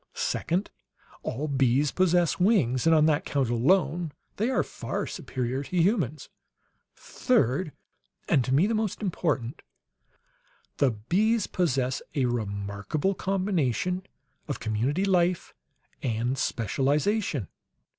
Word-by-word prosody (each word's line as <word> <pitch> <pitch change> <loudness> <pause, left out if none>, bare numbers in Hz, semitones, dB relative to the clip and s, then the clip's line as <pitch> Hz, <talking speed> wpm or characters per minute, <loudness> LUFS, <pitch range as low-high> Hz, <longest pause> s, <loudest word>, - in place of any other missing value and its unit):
Second, 180 +5 -1 0.5
all 145 +6 -3
bees 135 0 +2
possess 180 -2 +2
wings 170 - +3
and 165 - +6
on 155 -1 +5
that 155 -2 +2
count 135 -4 0
alone 155 +5 +2 0.3
they 220 +5 +1
are 265 - +2
far - - -4
superior 130 +1 -3
to 180 +6 -4
humans. 165 - +1 0.7
"Third 155 - 0 0.6
and 130 - +3
to 130 - -3
me, 145 +8 +4
the 225 - 0
most 215 -1 -2
important 150 - -1 1.2
the 140 - +4
bees 190 - +1
possess 135 -7 0
a 135 -3 +2
remarkable 105 - -2
combination 185 - 0 0.5
of 145 - -3
community 120 - 0
life 180 -2 +1 0.5
and 120 +2 -1
specialization. 140 - 0
150 Hz, 115 wpm, -27 LUFS, 125-185 Hz, 1.2 s, and